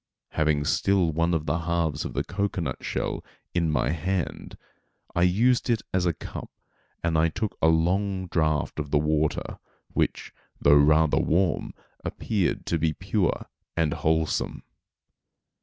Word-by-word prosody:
Having 75 -2 +1
still 95 +2 +2
one 85 +2 +1
of 80 -3 0
the 80 +3 0
halves 80 -3 -1
of - - -5
the - - 0
cocoanut 95 -9 -2
shell - - -2 0.3
in 85 -2 +1
my 75 - +1
hand, 90 +2 -3 0.6
I 85 - +2
used 115 +9 +3
it 115 -2 +1
as 90 -1 +2
a 85 - +2
cup - - -8 0.5
and 85 -1 +1 0.2
took 105 0 -2
a - - +5
long 95 +4 +2
draught 80 -3 0
of 75 -2 -3
the 75 - +3
water, 75 +1 0 0.3
which, - - -1 0.3
though 70 - +5
rather 75 +2 +5
warm, 85 -1 +1 0.3
appeared 100 -6 -1
to 85 - 0
be 80 0 +1
pure 90 +1 -1 0.3
and 80 -3 +2
wholesome. 80 0 0
85 Hz, 140 wpm, -26 LUFS, 75-95 Hz, 0.6 s, a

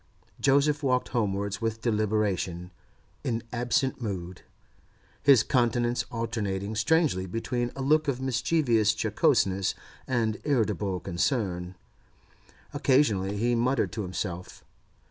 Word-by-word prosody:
Joseph 145 +2 +3
walked 125 -3 +1
homewards 100 -3 -1
with 115 0 -2
deliberation, 105 -5 -1 0.5
in 115 -2 -2
absent 125 +2 0
mood, 90 -5 -5 0.8
his 135 -6 +6
countenance 120 -1 +1
alternating 105 -3 -3
strangely 115 - +1
between 120 +4 -2
a 135 - -4
look 155 +3 +3
of 135 -3 0
mischievous 125 -4 +2
jocoseness 95 -2 +1 0.3
and 115 -4 0
irritable 105 - 0
concern; 90 -3 -1 1.0
occasionally 105 -8 +2
he 120 +3 +1
muttered 125 +3 +1
to 110 - -4
himself. 90 -1 -5
115 Hz, 105 wpm, -27 LUFS, 100-130 Hz, 1.0 s, his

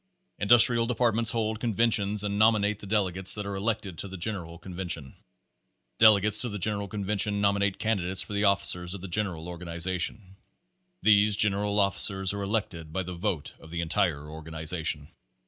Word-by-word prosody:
Industrial 115 +2 +6
Departments 115 -2 +1
hold 110 -2 -1
conventions 105 -3 0
and 100 0 -2
nom 110 +1 +5
inate 105 0 -1
the 100 - -9
delegates 95 -2 +1
that 105 -1 -3
are 100 0 -5
elected 100 -3 -3
to - - -5
the 95 0 -8
general 85 -3 -5
con 90 +2 -11
vention. 85 -6 -5 0.9
Delegates 105 -1 +6
to 120 - -1
the 105 - -5
general 100 0 -1
convention 100 +1 -1
nominate 100 -1 0
candidates 95 -4 -1
for - - -9
the 100 +1 -1
officers 90 -2 0
of 95 - -9
the 95 - -7
general 90 -3 -3
organization. 90 +3 -3 0.7
These 105 -1 +4
general 105 0 +2
officers 100 -1 +2
are 100 - -5
elected 100 -6 -4
by 95 +4 -3
the 90 +1 -7
vote 85 -4 -4
of 80 - -15
the 85 +1 -4
en 80 - -7
tire 75 -5 -1
organization. 80 -1 -3
100 Hz, 170 wpm, -27 LUFS, 90-105 Hz, 0.9 s, Industrial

